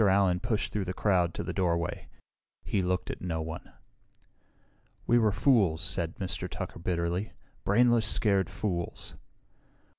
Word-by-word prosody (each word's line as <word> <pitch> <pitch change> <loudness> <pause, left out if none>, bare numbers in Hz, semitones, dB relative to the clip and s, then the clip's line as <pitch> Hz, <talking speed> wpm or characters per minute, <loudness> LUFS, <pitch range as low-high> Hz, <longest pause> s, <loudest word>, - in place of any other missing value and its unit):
Allen 95 -2 +3
pushed 110 +1 -2
through 105 -3 -1
the 90 0 -4
crowd 90 -5 +2
to - - -3
the 90 +1 -4
doorway. 85 -3 -1 0.6
He 100 - 0
looked 90 0 -1
at - - -8
no 85 -3 -2
one. 80 +1 -6 1.3
"We 120 0 +4
were 110 -2 +3
fools," 100 - +3
said 85 -3 -1
Mr. 95 -2 -3
Tucker - - -6
bitterly. 85 +3 -1 0.3
"Brainless, 120 +1 +4
scared 100 -5 +2
fools." 90 -2 -4
95 Hz, 140 wpm, -29 LUFS, 85-105 Hz, 1.3 s, We